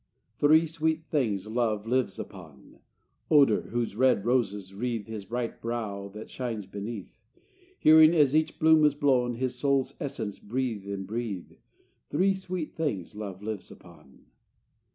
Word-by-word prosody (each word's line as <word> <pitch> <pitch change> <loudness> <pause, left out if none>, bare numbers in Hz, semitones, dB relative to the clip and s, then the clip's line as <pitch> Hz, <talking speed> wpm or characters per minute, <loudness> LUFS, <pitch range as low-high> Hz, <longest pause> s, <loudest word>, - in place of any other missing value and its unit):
Three 155 +3 +5
sweet 160 0 -1
things 110 - 0
love 110 -2 -1
lives 125 -4 0
upon: 80 -8 -11 0.5
Odor, 140 -8 +5
whose 120 -3 -2
red 125 -4 +3
roses 105 -6 0
wreathe 115 0 -3
His 110 -3 -7
bright 120 +1 -4
brow 110 -4 -4
that 105 - -7
shines 115 -5 -4
beneath; 100 +1 -7 0.6
Hearing, 155 +1 +7
as 145 -3 +4
each 155 0 +1
bloom 160 0 +5
is 150 -1 +4
blown, 130 -4 +2
His 130 +1 -2
soul's 140 -1 +1
essence 110 -8 -4
breathe 115 -3 -3
and 100 -1 -4
breathe. 105 -3 -4 0.6
Three 190 +6 +2
sweet 185 -4 -5
things 125 - -2
love 100 -2 -7
lives 105 -3 -5
upon. 65 - -17
120 Hz, 140 wpm, -28 LUFS, 105-145 Hz, 0.6 s, Hearing